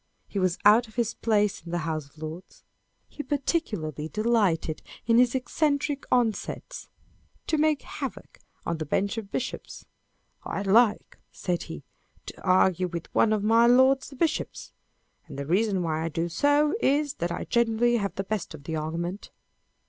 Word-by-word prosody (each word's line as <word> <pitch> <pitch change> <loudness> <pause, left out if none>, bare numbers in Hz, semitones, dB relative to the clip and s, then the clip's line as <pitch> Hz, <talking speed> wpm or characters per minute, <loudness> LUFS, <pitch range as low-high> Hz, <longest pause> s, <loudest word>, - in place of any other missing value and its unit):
He 200 - -3
was 185 -1 +1
out 220 +3 +6
of 220 - -18
his 235 -2 0
place 210 -3 +1
in 170 - -10
the 175 - -1
House 155 -3 -3
of 150 - -29
Lords. 160 +4 -9 0.6
lie - - +1
particularly 210 - -2
delighted, 210 -8 +1 0.2
in 230 +1 +4
his 250 0 +4
eccentric 285 +1 0
onsets, 245 - -1 0.6
to 310 - 0
make 305 -1 +2
havoc - - -7 0.3
of 170 -1 -2
the 155 - -3
bench 200 +9 0
of 205 -3 -10
bishops. 260 - -5 0.3
" - - -41
I 195 - -3
like," 210 +2 +3
said 175 -2 -2
he, 165 -3 -7 0.4
"to - - -10
argue 185 -1 +3
with 170 -1 -7
one 220 - +4
of 215 -2 +1
my 230 +2 +5
lords 260 +2 +4
the 275 - -12
bishops; 320 +3 -2 0.6
and 140 -3 -9
the 140 - -4
reason 190 +3 +1
why 160 -1 -1
I - - -1
do 165 +2 -2
so 290 - +2
is, 290 - +2
that 170 0 0
I - - -3
generally 235 0 +2
have 200 -3 -3
the 195 - -2
best 200 -5 -4
of 140 - -13
the 160 +2 -4
argument." 170 +5 -4
210 Hz, 170 wpm, -26 LUFS, 170-245 Hz, 0.6 s, out